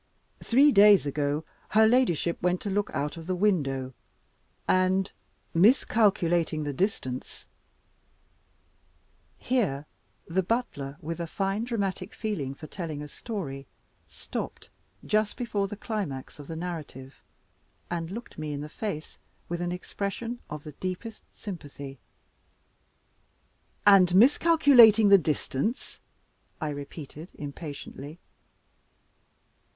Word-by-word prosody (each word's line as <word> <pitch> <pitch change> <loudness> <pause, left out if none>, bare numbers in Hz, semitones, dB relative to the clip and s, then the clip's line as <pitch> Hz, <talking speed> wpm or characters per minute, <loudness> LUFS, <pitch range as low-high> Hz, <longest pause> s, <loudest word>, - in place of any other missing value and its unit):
Three 275 +5 +5
days 205 - +7
ago, 145 +2 -1 0.2
her 220 +1 +5
ladyship 220 - +2
went 180 +1 +1
to 205 - -3
look 205 +1 0
out 150 +4 -2
of 165 0 -9
the 185 - 0
window, 140 -10 0 0.7
and, 185 +1 +2 0.4
miscalculating 175 - +3
the 145 -1 -3
distance 130 -7 -3 1.3
" - - -39
Here 190 - 0 0.4
the 180 +3 0
butler, 175 - -2
with 165 +2 -5
a 170 - -3
fine 195 +6 -1
dramatic 200 -5 -3
feeling 150 - -3
for 155 - -10
telling 155 -4 -5
a - - -7
story, 145 - -6 0.4
stopped - - -6 0.4
just 215 0 +1
before 210 -5 -1
the 205 - -7
climax 190 - -4
of 145 - -10
the 165 - -5
narrative, 155 -6 -7 0.7
and 165 -1 -2
looked 230 0 -8
me 155 -1 -3
in 145 - -4
the 150 - -6
face 155 -3 -5 0.3
with 175 0 -3
an 175 0 -1
expression 200 +6 -4
of 150 -1 -6
the 150 - -8
deepest 185 +8 -5
sympathy. 145 - -8 1.9
"And 185 -3 +7
miscalculating 245 - +7
the 200 -1 +8
distance?" 155 - -2 0.6
I 155 - -2
repeated 145 +3 -8
impatiently. 145 +1 -8
180 Hz, 115 wpm, -28 LUFS, 150-210 Hz, 1.9 s, the